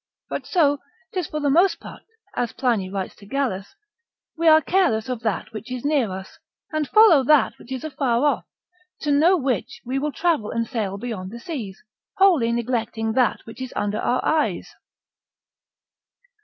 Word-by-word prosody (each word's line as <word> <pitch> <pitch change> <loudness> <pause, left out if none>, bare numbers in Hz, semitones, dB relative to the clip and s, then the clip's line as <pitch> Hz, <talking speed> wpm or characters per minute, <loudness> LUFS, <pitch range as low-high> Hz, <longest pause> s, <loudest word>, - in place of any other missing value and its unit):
But - - -4
so 290 -6 +3 0.3
'tis 365 -5 -2
for 305 - -4
the 290 -2 +1
most 355 +6 +4
part, - - -11 0.3
as 240 -2 -1
Pliny 225 -8 0
writes 195 -1 -4
to 200 - -15
Gallus, 250 - -2 0.6
We 335 0 0
are 315 0 +8
careless 315 - +1
of 250 -2 -2
that 220 -1 -3
which 220 +3 -8
is 255 +1 -5
near 285 -7 +2
us, 190 0 -8 0.3
and 310 -2 -1
follow 425 -10 +7
that 300 0 +4
which 250 - -15
is 260 -2 -4
afar 270 -4 0
off, 295 - +1 0.6
to 295 - 0
know 325 +6 +5
which 260 - -2
we 260 +3 -1
will 300 +2 -1
travel 320 -10 0
and 230 0 -1
sail 210 -6 -3
beyond 200 -4 -5
the 235 +4 -9
seas, 235 - -6 0.3
wholly 355 - +4
neglecting 230 -2 -1
that 250 -1 +2
which 225 +3 -11
is 260 - -6
under 205 0 -1
our 250 - 0
eyes. 315 -1 0
255 Hz, 170 wpm, -23 LUFS, 225-305 Hz, 0.6 s, are